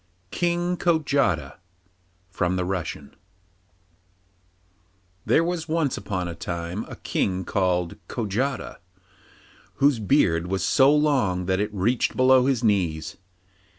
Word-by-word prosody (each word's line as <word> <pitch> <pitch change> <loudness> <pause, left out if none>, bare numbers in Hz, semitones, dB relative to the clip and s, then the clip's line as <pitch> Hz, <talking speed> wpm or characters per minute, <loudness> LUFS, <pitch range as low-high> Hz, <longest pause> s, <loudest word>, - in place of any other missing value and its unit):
KING 175 0 0
KOJATA 140 - +1 0.7
(From 90 0 -1
the 90 -1 -1
Russian) 85 -6 -5 2.1
There 165 - +4
was 170 -2 -3
once 160 -4 0
upon 90 -3 -3
a 85 - -5
time 85 +3 -5
a - - -9
king 95 -1 -2
called 90 -3 0
Kojata, 125 +5 -3 1.0
whose 140 -3 +3
beard 90 - +2
was 95 0 -2
so 135 +1 +5
long 135 -12 +1
that 95 +1 0
it 105 +1 -1
reached 110 +5 0
below 130 0 +5
his 130 -4 0
knees. 90 -8 0
105 Hz, 115 wpm, -24 LUFS, 90-140 Hz, 2.1 s, so